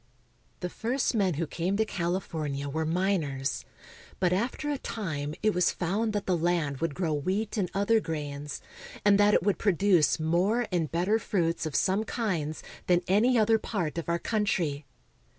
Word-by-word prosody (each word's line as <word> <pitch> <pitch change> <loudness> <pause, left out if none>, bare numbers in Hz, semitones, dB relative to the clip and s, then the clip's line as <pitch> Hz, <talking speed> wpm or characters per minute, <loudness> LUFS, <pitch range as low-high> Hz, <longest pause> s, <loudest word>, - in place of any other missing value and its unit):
The 180 - -2
first 250 +4 -1
men 195 -7 +1
who 165 +3 -1
came 175 +5 -2
to 220 - +2
California 165 -7 -2
were 160 +3 -2
miners; 160 -6 -1 0.5
but 180 -1 +2
after 245 +9 -1
a 285 - -2
time 155 - -4
it 215 -1 +3
was 180 0 +3
found 205 +6 -1
that 205 -1 -2
the 185 - +2
land 165 -4 0
would 165 -4 -2
grow 170 -4 0
wheat 190 +9 -1
and 195 -5 0
other 205 +3 +3
grains, 145 -5 -5 0.4
and 205 -1 +6
that 205 0 +5
it - - +3
would 205 0 +1
produce 190 -5 +3
more 180 +9 +2
and 170 -4 0
bet 170 +2 0
ter 215 +3 +3
fruits 170 -6 0
of 150 - -6
some 195 +2 +2
kinds 175 -10 -2 0.2
than 175 0 +3
any 230 +6 +4
other 220 0 +4
part 170 -8 -2
of 170 - -5
our 170 - +2
coun 210 +4 -1
try. 155 -7 -1
180 Hz, 180 wpm, -28 LUFS, 160-205 Hz, 0.5 s, and